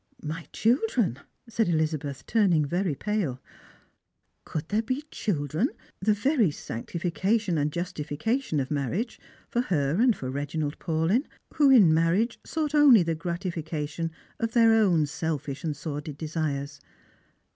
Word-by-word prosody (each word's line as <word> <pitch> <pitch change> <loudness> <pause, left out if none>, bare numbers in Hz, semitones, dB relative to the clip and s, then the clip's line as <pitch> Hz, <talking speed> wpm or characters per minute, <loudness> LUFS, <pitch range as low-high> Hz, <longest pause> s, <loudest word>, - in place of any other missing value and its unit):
"My 160 +1 -5
children!" 235 - +1 0.3
said 225 -3 0
Elizabeth, 155 -4 -1
turning 185 -9 +3
very 175 +1 -1
pale. 185 -7 -2 1.1
Could 155 0 -5
there 210 +1 +2
be 255 +5 -3
children, 160 - -1 0.3
the 210 +2 +2
very 245 +1 +2
sanctiflcation 175 - -2
and 145 +1 0
justiflcation 175 - -2
of 135 +1 -3
marriage, 160 - -2 0.3
for 240 - 0
her 150 - 0
and 245 -3 +4
for 130 -1 -5
Reginald 145 +2 -3
Paulyu, 165 - +1 0.3
who 290 -3 +4
in 210 -12 +7
marriage 175 +9 +2
sought 310 -2 -2
only 280 -10 +7
the 165 0 0
gratification 165 -2 -3 0.3
of 230 -1 -1
their 230 -2 +6
own 185 -8 +4
selfish 150 -2 -4
and 155 -3 -2
sordid 150 -1 -5
desires 145 -3 -3
165 Hz, 130 wpm, -27 LUFS, 150-220 Hz, 1.1 s, in